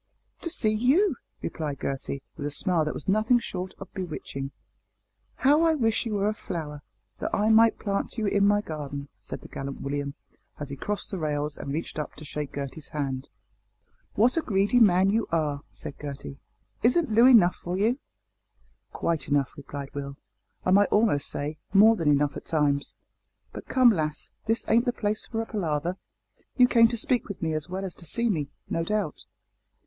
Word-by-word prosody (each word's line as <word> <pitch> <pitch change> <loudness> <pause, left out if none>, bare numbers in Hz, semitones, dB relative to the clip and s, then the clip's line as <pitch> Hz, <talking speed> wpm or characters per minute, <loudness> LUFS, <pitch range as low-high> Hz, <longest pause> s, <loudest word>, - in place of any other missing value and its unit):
"To 335 - -3
see 215 -9 +1
you," 270 - +3 0.3
replied 150 -4 -3
Gertie, 135 0 -3
with 145 -2 -4
a - - -1
smile 160 +2 +1
that 150 - -2
was - - -7
nothing 215 +5 +4
short 185 -5 -5
of 195 - -11
bewitching. 155 -7 -5 0.9
"How 290 +4 +4
I 325 -1 +4
wish 225 -3 +1
you 215 - -2
were 200 0 +1
a 215 - +1
flower, 155 -8 -6 0.4
that - - -2
I 210 +1 +2
might 225 +1 +6
plant 200 +3 -2
you 220 - 0
in 200 0 +3
my 205 0 +4
garden," 145 -5 -6
said - - -7
the - - -11
gallant 135 0 -6
William, 140 0 -3 0.4
as 145 -1 -5
he - - -4
crossed 205 +11 -3
the 190 - -3
rails 150 -1 -1
and 140 - -6
reached 160 +1 -4
up 150 - -5
to 155 - -10
shake 145 -1 -5
Gertie's 140 +1 -5
hand. 135 -3 -3 0.9
"What 240 +8 +4
a - - +3
greedy 205 0 +2
man 190 -3 +5
you 225 +2 +1
are!" 150 -4 0
said - - -8
Gertie. 140 -1 -7 0.4
"Isn't 275 +4 +3
Loo 230 +3 +7
enough 210 -9 +7
for 175 +1 -4
you?" 230 +7 +2 0.9
"Quite 165 -2 -1
enough," 140 -2 +1
replied 140 -1 -7
Will, 140 -1 -5 0.5
"I 185 - +2
might 200 +2 +5
almost 210 -10 +2
say 150 +2 -4 0.2
more 220 +3 +8
than 165 -7 +1
enough 145 0 +2
at - - -7
times; 145 -3 0 0.6
but - - -8
come, 255 -2 +6
lass, 155 -5 -2
this 225 +1 0
ain't 230 +2 +4
the 245 - +1
place 210 -1 -2
for 225 -1 -2
a - - -8
palaver. 170 -5 -1 0.6
You 250 -1 +7
came 230 -2 +6
to 235 - -3
speak 245 +2 +1
with 200 -4 -7
me 160 -1 0
as 155 0 -3
well 190 +2 -3
as 185 - -5
to 170 - -12
see 235 +7 +1
me, 150 -6 -2 0.2
no 165 - -1
doubt." 205 -3 -2
180 Hz, 190 wpm, -27 LUFS, 145-220 Hz, 0.9 s, more